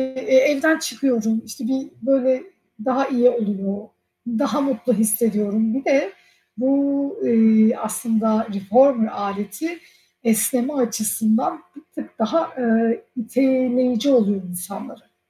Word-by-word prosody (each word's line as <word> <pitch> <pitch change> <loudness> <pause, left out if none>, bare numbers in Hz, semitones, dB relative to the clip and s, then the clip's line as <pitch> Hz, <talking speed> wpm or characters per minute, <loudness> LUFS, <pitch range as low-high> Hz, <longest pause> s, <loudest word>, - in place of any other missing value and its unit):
E, 260 0 0
evden 290 +4 +4
çıkıyorum, 240 -7 -1
işte, 225 +1 -7
bir, 265 +2 -2
böyle, 260 +1 +1 0.4
daha 265 +1 +1
iyi 250 -2 +4
oluyor, 205 -4 -3 0.5
daha 275 +5 -1
mutlu 255 -3 -1
hissediyorum. 220 0 +1
Bir 270 - -4
de 290 +3 +2 0.5
bu, 280 - 0
eee, 225 0 +4
aslında 220 0 -1
reformer 225 +4 +3
aleti 205 - -5 0.4
esneme 235 +4 +1
açısından 230 - 0 0.2
bir 290 - -15
tık 295 - -10
daha, 320 +10 0
ııı, 230 -1 +2 0.2
iteleyici 255 +1 +1
oluyor 205 -6 +2
insanlara. 180 - -10
240 Hz, 110 wpm, -21 LUFS, 220-270 Hz, 0.5 s, evden